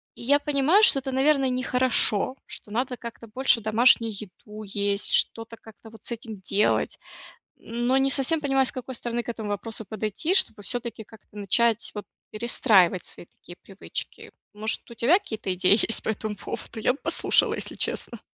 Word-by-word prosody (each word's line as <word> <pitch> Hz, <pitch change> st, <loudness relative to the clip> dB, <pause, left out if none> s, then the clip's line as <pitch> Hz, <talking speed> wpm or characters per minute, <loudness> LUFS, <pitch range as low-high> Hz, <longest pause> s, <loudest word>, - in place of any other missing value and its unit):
И, -, -, -11 dB
я 285 Hz, +4 st, +4 dB
понимаю, 295 Hz, +8 st, +3 dB
что 285 Hz, -11 st, +6 dB
это, 265 Hz, 0 st, -5 dB
наверно, 270 Hz, 0 st, +3 dB
не 255 Hz, 0 st, -2 dB
хорошо, 250 Hz, -2 st, +3 dB
что -, -, -10 dB
надо, 250 Hz, +2 st, -2 dB
как-то, 235 Hz, 0 st, -10 dB
больше 240 Hz, +1 st, +2 dB
домашнюю 225 Hz, +1 st, +4 dB
еду 210 Hz, +1 st, -10 dB
есть, 200 Hz, 0 st, -1 dB
что-то 225 Hz, 0 st, +1 dB
как-то 220 Hz, 0 st, -15 dB
вот 220 Hz, -2 st, -16 dB
с -, -, -6 dB
этим 225 Hz, -4 st, -7 dB
делать, 200 Hz, +2 st, 0 dB, 0.6 s
но, 240 Hz, +3 st, -2 dB
не 270 Hz, 0 st, +2 dB
совсем 285 Hz, +4 st, +1 dB
понимаю, 270 Hz, -2 st, +2 dB
с -, -, 0 dB
какой 255 Hz, -1 st, -6 dB
стороны 240 Hz, 0 st, -4 dB
к -, -, -9 dB
этому 225 Hz, -2 st, -5 dB
вопросу 220 Hz, +1 st, -4 dB
подойти, 220 Hz, -, -3 dB
чтобы, 375 Hz, -, +1 dB
всё-таки, 235 Hz, 0 st, -4 dB
как-то 210 Hz, -1 st, -17 dB
начать, 225 Hz, +3 st, +1 dB
вот, 210 Hz, -, -6 dB, 0.3 s
перестраивать 210 Hz, -5 st, +2 dB
свои -, -, -7 dB
такие 175 Hz, -, -15 dB
привычки. 195 Hz, 0 st, -7 dB, 0.2 s
Может, 215 Hz, +3 st, -1 dB
у 235 Hz, -, -10 dB
тебя 270 Hz, -, +4 dB
какие-то 220 Hz, -, -4 dB
идеи 185 Hz, +4 st, +3 dB
есть 225 Hz, -, -1 dB
по -, -, -3 dB
этому 215 Hz, -1 st, -3 dB
поводу? 220 Hz, +3 st, -8 dB
Я 250 Hz, -, +3 dB
бы 280 Hz, -, -13 dB
послушала, -, -, +2 dB
если -, -, -6 dB
честно. 235 Hz, -, -3 dB
230 Hz, 180 wpm, -25 LUFS, 210-260 Hz, 0.6 s, что